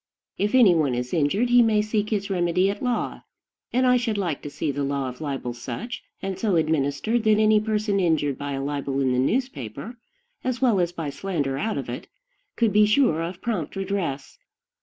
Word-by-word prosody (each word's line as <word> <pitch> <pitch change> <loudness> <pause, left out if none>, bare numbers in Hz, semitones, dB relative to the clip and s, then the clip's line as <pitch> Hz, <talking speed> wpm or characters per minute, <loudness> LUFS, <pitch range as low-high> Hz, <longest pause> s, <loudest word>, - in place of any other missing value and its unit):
If 210 +4 +1
any 230 -8 +7
one 150 -6 +1
is 125 0 -4
injured, 185 +10 +1
he 245 0 +7
may 215 -2 +3
seek 215 -1 -1
his 200 -2 -2
remedy 180 +1 +2
at 200 - -8
law; 250 -2 -2 0.5
and 255 +2 +2
I 250 0 +5
should 235 -3 -1
like 175 -7 -2
to 145 - -6
see 145 +1 -2
the 140 +1 -3
law 140 -1 -1
of 125 +3 -8
libel 135 -5 -3
such 125 - -6 0.2
and 190 -1 -3
so 205 -4 +1
administered 160 - +1
that 215 -1 +5
any 215 0 +5
person 210 -1 0
injured 155 -6 +1
by 145 +1 -5
a 135 0 -3
libel 140 -1 -2
in 130 -2 +2
the 125 - +1
newspaper, 145 - -2 0.5
as 255 -1 -1
well 240 -7 +3
as 175 -1 +1
by 165 -5 -4
slander 145 -4 -2
out 220 +4 -1
of - - -4
it, - - -6 0.5
could 225 -4 +2
be 210 0 +5
sure 215 - +3
of 170 +2 -5
prompt 205 -11 -2
redress. 190 -8 -3
185 Hz, 200 wpm, -24 LUFS, 145-215 Hz, 0.5 s, any